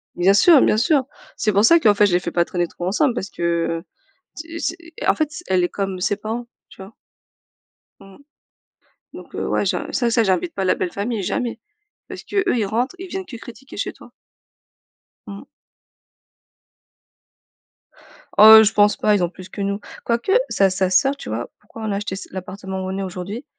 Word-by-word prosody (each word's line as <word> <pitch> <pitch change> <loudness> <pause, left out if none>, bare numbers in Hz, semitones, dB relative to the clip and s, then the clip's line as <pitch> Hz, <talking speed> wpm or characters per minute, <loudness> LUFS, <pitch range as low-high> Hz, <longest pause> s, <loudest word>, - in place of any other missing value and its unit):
Bien 185 +3 +4
sûr, 285 - +6
bien - - +3
sûr. 275 +4 +2 0.3
C'est 215 - +1
pour 200 +2 +3
ça 335 +7 +6
qu'en 215 -9 +4
fait 205 +1 +4
je 185 - -1
les 175 - +4
fais 175 - -5
pas 170 0 +1
traîner 175 -1 -2
trop 175 +1 -6
ensemble 250 +7 +1
parce 200 -4 -5
que, - - -11 0.4
heu, - - -22 0.5
c'est 330 +1 -8
c'est 335 - -2 0.3
en - - +5
fait, 310 - -1
c'est 310 +3 -9
elle 185 -1 +2
est - - 0
comme 195 -1 -4
ses 205 +2 0
parents, 225 +4 -5 0.2
tu - - -13
vois? 195 +4 -13 1.1
Mmh. 195 -1 -16 1.0
Donc, - - -12
heu, - - -3
ouais, - - 0
ja - - -1
ça 240 -3 0
ça 230 0 +3
j'invite 200 - 0
pas 195 - -2
la 185 - +3
belle 180 - -3
famille, 210 +1 -3
jamais 235 +5 -3 0.5
parce - - -8
qu'eux, 395 -2 -1
ils 220 -4 0
rentrent, 240 - -1
ils 380 +1 -8
viennent 380 +1 -5
que 245 - -9
critiquer 240 +3 -12
chez - - -3
toi. - - -17 1.2
Mmh. 200 -1 -8 2.9
Oh 220 +1 +10
je 215 - +2
pense 205 0 +4
pas. 210 - +2
Ils 185 - +1
ont 175 - 0
plus 185 +1 -13
que 200 - -7
nous, 200 +1 -2 0.2
quoique 235 +10 -1 0.2
sa 195 -1 +3
sa 185 0 0
soeur, 270 +10 +3
tu - - -9
vois? 115 +2 -4
Pourquoi 210 +2 -13
on 215 - -2
a - - -1
acheté 205 -2 -4
s 190 - -7
l'appartement 190 +1 -6
où - - -4
on 190 - -4
est 195 - -3
aujourd'hui? 190 +6 -6
205 Hz, 205 wpm, -21 LUFS, 190-240 Hz, 2.9 s, Oh